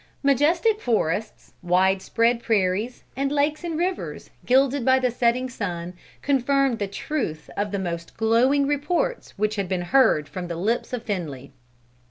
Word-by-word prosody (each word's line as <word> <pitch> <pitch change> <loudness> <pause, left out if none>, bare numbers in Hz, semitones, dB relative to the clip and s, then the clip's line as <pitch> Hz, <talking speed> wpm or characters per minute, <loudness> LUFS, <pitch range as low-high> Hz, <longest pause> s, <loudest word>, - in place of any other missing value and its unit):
Majestic 335 - +3
forests, 215 -2 -1
wide 185 +2 +2
spread 230 +3 +1
prairies, 210 +2 0
and 275 +2 -1
lakes 295 +2 0
and 335 -2 -3
rivers, 360 +2 -3 0.2
gilded 265 +1 +3
by 260 +2 +4
the 255 -1 +1
setting 245 +2 +1
sun, 180 -7 -5 0.3
confirmed 275 -2 +2
the 200 - -1
truth 195 - -4
of 205 0 -1
the 200 - -1
most 170 -3 -5
glowing 245 +6 +3
reports 350 - -1
which 215 +1 0
had 195 -3 -2
been 185 -2 -1
heard 220 - +3
from 180 -1 -6
the 170 - -4
lips 215 +8 -1
of 245 -2 -4
Finley. 155 - -5
235 Hz, 155 wpm, -24 LUFS, 190-275 Hz, 0.3 s, by